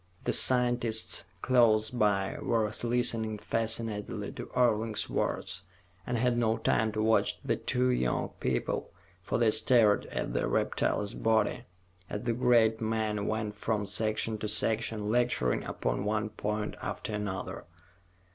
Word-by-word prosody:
The -, -, 0 dB
scientists 120 Hz, -3 st, +2 dB, 0.2 s
close 115 Hz, -4 st, +3 dB
by 105 Hz, -5 st, +1 dB
were 115 Hz, -2 st, +1 dB, 0.2 s
listening 115 Hz, -2 st, +1 dB
fascinatedly 110 Hz, 0 st, -3 dB
to -, -, -8 dB
Orling's 115 Hz, -3 st, +2 dB
words, 95 Hz, +1 st, -2 dB, 0.5 s
and 125 Hz, -, -1 dB
had 120 Hz, 0 st, +1 dB
no 115 Hz, -1 st, +1 dB
time 110 Hz, 0 st, +1 dB
to 110 Hz, 0 st, -1 dB
watch 110 Hz, 0 st, +2 dB
the -, -, +1 dB
two 125 Hz, 0 st, 0 dB
young 65 Hz, -, 0 dB
people, 65 Hz, -, -2 dB, 0.3 s
for -, -, -2 dB
they 115 Hz, -2 st, +3 dB
stared 110 Hz, -3 st, +4 dB
at -, -, -4 dB
the -, -, 0 dB
reptile's 105 Hz, -1 st, 0 dB
body 110 Hz, +2 st, 0 dB, 0.4 s
as 105 Hz, -, -4 dB
the 120 Hz, -1 st, 0 dB
great 115 Hz, -2 st, +3 dB
man 110 Hz, -2 st, -1 dB
went 110 Hz, -1 st, -2 dB
from 105 Hz, 0 st, -2 dB
section 110 Hz, +1 st, 0 dB
to 105 Hz, -, -3 dB
section, 110 Hz, 0 st, 0 dB
lecturing 120 Hz, -, +1 dB
upon -, -, -2 dB
one 105 Hz, +1 st, -1 dB
point 105 Hz, 0 st, -3 dB
after 110 Hz, -, -5 dB
another. 105 Hz, -2 st, -4 dB
110 Hz, 135 wpm, -30 LUFS, 105-115 Hz, 0.5 s, stared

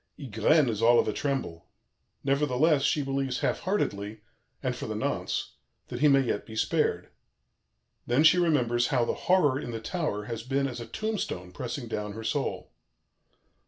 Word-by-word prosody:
Ygraine 135 Hz, +4 st, +2 dB
is 110 Hz, -2 st, -2 dB
all 120 Hz, +1 st, +6 dB
of -, -, +3 dB
a 110 Hz, -, 0 dB
tremble; 130 Hz, -, -3 dB, 0.6 s
nevertheless, 140 Hz, +2 st, +2 dB
she 145 Hz, +2 st, +1 dB
believes 135 Hz, -1 st, -2 dB
half -, -, 0 dB
heartedly 110 Hz, -, -2 dB, 0.4 s
and -, -, -1 dB
for -, -, -6 dB
the -, -, -3 dB
nonce -, -, -2 dB, 0.3 s
that -, -, -5 dB
he 150 Hz, -, +5 dB
may 135 Hz, -1 st, +5 dB
yet 120 Hz, -5 st, -1 dB
be 110 Hz, -, -11 dB
spared; -, -, 0 dB, 1.0 s
then 125 Hz, +5 st, +3 dB
she 175 Hz, +3 st, +6 dB
remembers 120 Hz, -8 st, +2 dB
how 125 Hz, -3 st, +2 dB
the -, -, -1 dB, 0.2 s
Horror 150 Hz, -8 st, +4 dB
in 125 Hz, -, -6 dB
the 115 Hz, -1 st, -4 dB
tower 115 Hz, -, -2 dB
has 115 Hz, +1 st, -5 dB
been 135 Hz, +3 st, 0 dB
as 125 Hz, -2 st, -6 dB
a 115 Hz, -, -7 dB
tombstone 115 Hz, -, -3 dB
pressing 120 Hz, +5 st, -5 dB
down 105 Hz, -2 st, -4 dB
her 110 Hz, +2 st, -7 dB
soul. 110 Hz, -, -2 dB
125 Hz, 170 wpm, -28 LUFS, 110-145 Hz, 1.0 s, all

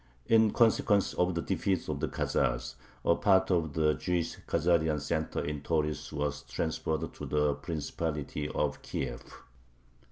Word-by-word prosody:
In 110 Hz, -1 st, +5 dB
consequence 105 Hz, -3 st, +3 dB
of 90 Hz, 0 st, +1 dB
the 85 Hz, -, -1 dB
defeat 95 Hz, -3 st, 0 dB
of -, -, -2 dB
the -, -, 0 dB
Khazars, -, -, -1 dB, 0.3 s
a -, -, +5 dB
part 95 Hz, -2 st, +3 dB
of 80 Hz, -5 st, +1 dB
the 75 Hz, -1 st, +3 dB
Jewish 90 Hz, -1 st, -1 dB
Khazarian 80 Hz, -2 st, +2 dB
center 80 Hz, +2 st, -2 dB
in 75 Hz, -1 st, -3 dB
Tauris 75 Hz, -1 st, -1 dB
was 75 Hz, -1 st, -2 dB
transferred 80 Hz, -1 st, -2 dB
to -, -, -7 dB
the 75 Hz, -1 st, +2 dB
Principality 75 Hz, -1 st, -3 dB
of -, -, -1 dB
Kiev. 60 Hz, -3 st, -4 dB
80 Hz, 140 wpm, -30 LUFS, 75-85 Hz, 0.3 s, In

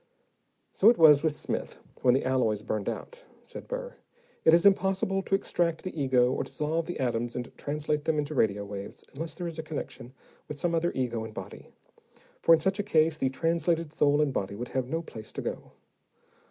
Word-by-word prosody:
"So 210 Hz, -, +6 dB
it 240 Hz, -, +4 dB
was 150 Hz, -3 st, +7 dB
with 155 Hz, -2 st, 0 dB
Smith, -, -, -4 dB, 0.2 s
when 125 Hz, -1 st, +5 dB
the 135 Hz, -, 0 dB
alloys 115 Hz, -5 st, +1 dB
burned 105 Hz, -2 st, -2 dB
out," -, -, -7 dB, 0.2 s
said -, -, -10 dB
Burr. -, -, -5 dB, 0.5 s
"It -, -, +6 dB
is 170 Hz, +2 st, +5 dB
impossible 195 Hz, 0 st, +3 dB
to 195 Hz, -, 0 dB
extract 170 Hz, -4 st, -1 dB
the 185 Hz, -, -6 dB
ego 130 Hz, -4 st, +3 dB
or -, -, -1 dB
dissolve 160 Hz, +2 st, -2 dB
the 175 Hz, -, -5 dB
atoms 120 Hz, -2 st, -1 dB
and 125 Hz, 0 st, -6 dB
translate 150 Hz, 0 st, -2 dB
them 160 Hz, -1 st, +1 dB
into 150 Hz, +1 st, -2 dB
radio 105 Hz, -6 st, +1 dB
waves 100 Hz, 0 st, -8 dB
unless 160 Hz, +4 st, -6 dB
there 180 Hz, -, -5 dB
is 165 Hz, -2 st, -5 dB
a -, -, -3 dB
connection 140 Hz, -5 st, -7 dB, 0.3 s
with 150 Hz, -, -6 dB
some 170 Hz, +3 st, 0 dB
other 170 Hz, +1 st, +1 dB
ego 120 Hz, -3 st, -1 dB
and 110 Hz, -1 st, -9 dB
body, -, -, -8 dB, 0.7 s
for -, -, +4 dB
in 165 Hz, -, +8 dB
such 190 Hz, +4 st, 0 dB
a 205 Hz, 0 st, -3 dB
case 160 Hz, -3 st, +4 dB
the 130 Hz, -, +1 dB
translated 165 Hz, +2 st, 0 dB
soul 145 Hz, 0 st, +3 dB
and 140 Hz, -3 st, -1 dB
body 100 Hz, -3 st, -2 dB
would 120 Hz, +4 st, -6 dB
have 130 Hz, -2 st, -2 dB
no 165 Hz, +5 st, -2 dB
place 110 Hz, -8 st, -10 dB
to -, -, -5 dB
go. -, -, -5 dB
150 Hz, 205 wpm, -28 LUFS, 125-170 Hz, 0.7 s, in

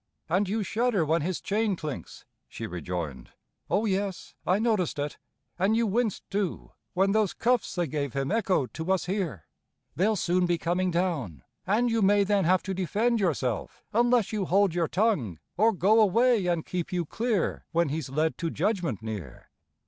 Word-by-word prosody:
"And 185 Hz, +4 st, +1 dB
you 215 Hz, +1 st, 0 dB
shudder 220 Hz, -4 st, +1 dB
when 160 Hz, +2 st, +2 dB
his 180 Hz, +3 st, -2 dB
chain 210 Hz, 0 st, 0 dB
clinks!" 155 Hz, -6 st, -7 dB, 0.2 s
she -, -, -6 dB
rejoined. 85 Hz, -6 st, -5 dB, 0.4 s
"O 215 Hz, -, +2 dB
yes, 195 Hz, -2 st, -2 dB
I 185 Hz, -, +4 dB
noticed 215 Hz, -8 st, 0 dB
it. 145 Hz, 0 st, -3 dB, 0.4 s
And 200 Hz, +5 st, +3 dB
you 230 Hz, -, +2 dB
winced, 220 Hz, 0 st, 0 dB
too, 200 Hz, -3 st, -2 dB, 0.2 s
when 195 Hz, +2 st, +3 dB
those 215 Hz, -2 st, +2 dB
cuffs 245 Hz, +1 st, +1 dB
they 175 Hz, -1 st, +1 dB
gave 140 Hz, -3 st, -3 dB
him 135 Hz, -1 st, -1 dB
echoed 195 Hz, -, +1 dB
to 165 Hz, +3 st, -3 dB
us 190 Hz, -3 st, +1 dB
here. 175 Hz, -, -3 dB, 0.5 s
They'll 210 Hz, +5 st, +2 dB
soon 180 Hz, -1 st, +1 dB
be 175 Hz, -1 st, +1 dB
coming 180 Hz, +3 st, 0 dB
down, 160 Hz, -, -2 dB, 0.2 s
and 230 Hz, +5 st, +2 dB
you 225 Hz, -1 st, +1 dB
may 205 Hz, +1 st, +5 dB
then 200 Hz, -2 st, +2 dB
have 185 Hz, +1 st, +3 dB
to 190 Hz, -, -3 dB
defend 210 Hz, +6 st, +1 dB
yourself 135 Hz, -, -1 dB
Unless 240 Hz, -1 st, +3 dB
you 205 Hz, -3 st, 0 dB
hold 195 Hz, 0 st, +3 dB
your 170 Hz, -2 st, +1 dB
tongue, 170 Hz, -, 0 dB, 0.2 s
or 220 Hz, +4 st, +4 dB
go 215 Hz, +3 st, +4 dB
away 220 Hz, 0 st, +3 dB
and 170 Hz, -2 st, 0 dB
keep 180 Hz, -2 st, -3 dB
you 175 Hz, -2 st, -1 dB
clear 220 Hz, +2 st, -1 dB
When 170 Hz, -2 st, +2 dB
he's 150 Hz, -2 st, -3 dB
led 155 Hz, +4 st, 0 dB
to 170 Hz, -, -1 dB
judgment 170 Hz, -, -1 dB
near!" 100 Hz, -, -7 dB
185 Hz, 180 wpm, -27 LUFS, 160-210 Hz, 0.5 s, may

